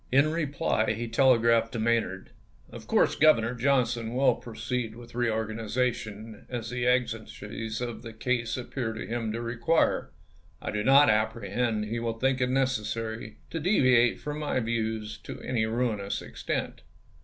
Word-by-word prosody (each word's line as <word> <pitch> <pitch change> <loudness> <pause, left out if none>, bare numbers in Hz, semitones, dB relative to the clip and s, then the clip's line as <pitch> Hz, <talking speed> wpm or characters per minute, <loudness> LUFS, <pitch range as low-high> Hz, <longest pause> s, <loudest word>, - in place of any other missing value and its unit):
In 140 +4 +4
reply 145 -8 0
he 115 +2 -4
telegraphed 115 -2 +4
to 115 - -2
Maynard: 110 -4 0 0.4
"Of - - -10
course - - +3
Governor 125 -7 +4
Johnson 120 -2 +1
will 135 +2 +4
proceed 115 0 -4
with 120 0 -12
reorganization 110 -1 -2
as 120 -2 -4
the 125 0 -1
exigencies 115 -2 -2
of 120 -3 -4
the 115 -1 -8
case 115 +1 -1
appear 120 -2 -3
to 110 - -6
him 115 -1 -2
to 110 - -3
requn 120 +7 +1
e. - - -23 0.5
I - - -4
do 105 0 -1
not 140 +2 +7
apprehend 110 0 0
he 115 +2 -3
will 115 -1 -2
think 130 +1 +1
it 125 - +2
necessary 115 -4 -2
to 165 - -2
deviate 130 - +4
from 150 0 -5
my 150 -3 0
views 110 -2 -2
to - - -8
any 115 -3 0
ruinous 110 -4 -1
extent. - - -4
115 Hz, 155 wpm, -28 LUFS, 110-125 Hz, 0.5 s, not